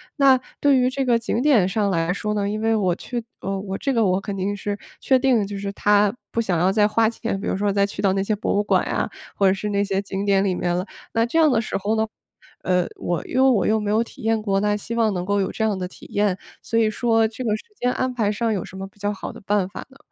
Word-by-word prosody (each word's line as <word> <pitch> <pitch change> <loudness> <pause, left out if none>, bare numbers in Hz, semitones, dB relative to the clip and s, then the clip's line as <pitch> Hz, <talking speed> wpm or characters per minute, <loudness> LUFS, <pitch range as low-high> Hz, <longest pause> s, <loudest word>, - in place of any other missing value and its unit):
那 275 -3 +5 0.2
对 285 -2 +5
于 250 0 +3
这 270 +1 -2
个 240 -3 +3
景 230 +1 -1
点 255 -10 +4
上 205 +1 0
来 170 -1 +1
说 210 +2 -2
呢， 200 -1 -1
因 215 +1 -3
为 225 0 +2
我 190 -5 +1
去 240 +5 -5 0.2
呃， 195 0 -2
我 195 0 -4
这 275 - -1
个 230 -3 +3
我 185 0 +2
肯 200 0 -5
定 195 +2 -1
是 205 0 -4 0.2
确 260 -1 +3
定 260 -2 +3
的 210 - +1
就 200 0 -6
是 200 0 -4
他 205 +1 +3 0.2
不 - - -1
想 190 -6 0
要 180 +3 +3
再 210 +1 +4
花 220 +1 +2
钱， 230 -2 -3
比 - - -5
如 - - -1
说 205 +1 +1
再 200 0 +3
去 200 - -6
到 195 -2 +3
那 195 0 0
些 215 - 0
博 210 - -1
物 205 - +2
馆 210 - +1
呀， - - -1 0.3
或 200 - +2
者 190 - +5
是 195 +2 -4
那 200 0 +1
些 195 -1 -1
景 195 0 -4
点 200 -1 +3
里 195 -2 +1
面 175 -1 -1
了。 180 +1 -1 0.3
那 230 0 +2
这 240 +7 -2
样 315 -2 +5
的 235 - +3
时 220 - -4
候 205 +3 -1
呢， 220 0 +1 0.6
呃， 180 -1 +1
我 175 -1 -3
又 260 +1 +4
我 205 -7 +2
又 220 - +3
没 210 -1 -1
有 220 +2 +3
体 235 - -8
验 225 0 +1
过， 195 -2 0
那 210 0 +1
希 230 +3 -6
望 225 -3 +2
能 180 -1 -3
够 200 +1 +1
有 190 - -1
这 - - -6
样 210 -3 0
的 185 - -3
体 180 - -12
验， 205 -2 +1 0.2
所 230 - 0
以 220 -1 +3
说 225 0 +2
这 225 +3 -7
个 220 -3 +1
时 - - -12
间 250 - +1
安 255 0 -1
排 215 -4 +1
上 225 +1 0
有 195 - -2
什 190 - -10
么 195 0 -5
比 195 - -24
较 205 0 -1
好 195 - -7
的 - - -12
办 205 -2 +1
法 195 - -8
呢？ 270 - -18
205 Hz, 315 characters per minute, -22 LUFS, 195-230 Hz, 0.6 s, 那